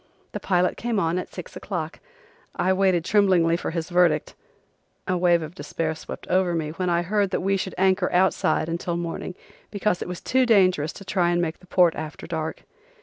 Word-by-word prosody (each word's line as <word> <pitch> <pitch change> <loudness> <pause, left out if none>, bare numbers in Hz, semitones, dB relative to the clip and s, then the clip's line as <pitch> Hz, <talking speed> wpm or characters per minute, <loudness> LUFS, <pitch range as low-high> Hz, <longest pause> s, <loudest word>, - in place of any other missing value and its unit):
The - - -4
pilot 180 -1 +1
came 235 -3 -1
on 170 0 0
at - - -7
six - - -9
o'clock. - - -5 0.6
I 185 +1 +2
waited 185 -3 +2
tremblingly 185 -6 +3
for 170 - -3
his 165 +1 -4
verdict. 175 -4 +2 0.7
A 185 - +1
wave 175 -2 +3
of 155 +1 -8
despair 165 -3 -3
swept 160 - -9
over 180 -1 +2
me 155 -2 -2
when 180 +3 -2
I 170 0 +1
heard 200 +2 +1
that 185 - -1
we 195 +2 +1
should 190 0 -3
anchor 190 0 +2
outside 180 -3 +2
until 170 +1 -2
morning, 170 +1 -5 0.3
because 205 -3 -1
it - - -4
was 180 -1 -5
too 260 -1 +1
dangerous 185 -8 +3
to 195 - -11
try 180 -2 +1
to - - +1
make 165 -2 -2
the 180 - -19
port 175 -2 +4
after 155 0 -7
dark. 160 -1 -4
180 Hz, 200 wpm, -24 LUFS, 165-190 Hz, 0.7 s, port